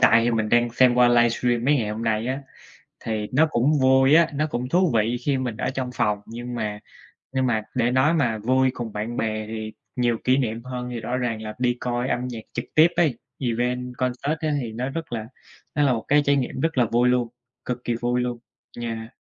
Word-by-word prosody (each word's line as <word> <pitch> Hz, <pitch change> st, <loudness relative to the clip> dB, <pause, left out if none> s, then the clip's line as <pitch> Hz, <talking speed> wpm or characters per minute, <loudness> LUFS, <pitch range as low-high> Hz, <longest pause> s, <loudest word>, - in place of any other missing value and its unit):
tại 115 Hz, -2 st, +6 dB
thì 120 Hz, -, +2 dB
mình 110 Hz, -2 st, 0 dB
đang 120 Hz, +1 st, +3 dB
xem 125 Hz, 0 st, +4 dB
qua 125 Hz, 0 st, +5 dB
livestream 120 Hz, 0 st, +2 dB
mấy 145 Hz, +2 st, +4 dB
ngày 110 Hz, -6 st, -1 dB
hôm 110 Hz, +2 st, -4 dB
nay 110 Hz, 0 st, 0 dB
á, 130 Hz, +2 st, -2 dB, 0.6 s
thì 110 Hz, -2 st, -3 dB
nó 155 Hz, +5 st, +5 dB
cũng 140 Hz, +5 st, +2 dB
vui 130 Hz, +2 st, +5 dB
á, 165 Hz, 0 st, +6 dB
nó 150 Hz, +2 st, 0 dB
cũng 125 Hz, -3 st, -3 dB
thú 180 Hz, +2 st, +3 dB
vị 115 Hz, +3 st, +2 dB
khi 140 Hz, -2 st, +2 dB
mình 125 Hz, -4 st, -3 dB
ở -, -, -1 dB
trong 130 Hz, -1 st, -3 dB
phòng. 105 Hz, -4 st, 0 dB
Nhưng 120 Hz, +2 st, -7 dB
mà 105 Hz, -3 st, -3 dB, 0.5 s
nhưng 130 Hz, -1 st, +1 dB
mà 110 Hz, -3 st, +1 dB
để 120 Hz, -1 st, +2 dB
nói 130 Hz, +6 st, +3 dB
mà 120 Hz, -9 st, +1 dB
vui 130 Hz, +4 st, +2 dB
cùng 115 Hz, -3 st, -5 dB
bạn 110 Hz, +3 st, -4 dB
bè 110 Hz, -2 st, -2 dB
thì 110 Hz, 0 st, -5 dB, 0.2 s
nhiều 120 Hz, -2 st, +1 dB
kỷ 130 Hz, +1 st, +4 dB
niệm 115 Hz, -4 st, -1 dB
hơn 125 Hz, -1 st, -5 dB
thì 120 Hz, -1 st, -4 dB
rõ 120 Hz, +3 st, -2 dB
ràng 115 Hz, -3 st, -2 dB
là 110 Hz, 0 st, -6 dB
đi 120 Hz, -1 st, +1 dB
coi 120 Hz, 0 st, -1 dB
âm 125 Hz, 0 st, -1 dB
nhạc 115 Hz, -3 st, -6 dB
trực -, -, -3 dB
tiếp 155 Hz, +2 st, +7 dB
ấy, 150 Hz, -9 st, +2 dB, 0.2 s
event, 125 Hz, 0 st, -1 dB
concert 130 Hz, +5 st, -1 dB
á 155 Hz, -2 st, -1 dB
thì 115 Hz, -4 st, -5 dB
nó 125 Hz, +4 st, -3 dB
rất 165 Hz, 0 st, -6 dB
là 110 Hz, -2 st, -3 dB, 0.5 s
nó 145 Hz, -, +2 dB
là 140 Hz, -3 st, +4 dB
một 115 Hz, -, -2 dB
cái 145 Hz, +1 st, +5 dB
trải 140 Hz, 0 st, +3 dB
nghiệm 130 Hz, -1 st, -2 dB
rất 160 Hz, -1 st, 0 dB
là 125 Hz, -, +5 dB
vui 120 Hz, +2 st, +2 dB
luôn, 125 Hz, -1 st, +2 dB, 0.4 s
cực 125 Hz, 0 st, -4 dB
kỳ 120 Hz, -, 0 dB
vui 120 Hz, +1 st, 0 dB
luôn, 125 Hz, -1 st, -2 dB, 0.4 s
yeah. 115 Hz, +1 st, -5 dB
125 Hz, 235 wpm, -24 LUFS, 115-130 Hz, 0.6 s, tiếp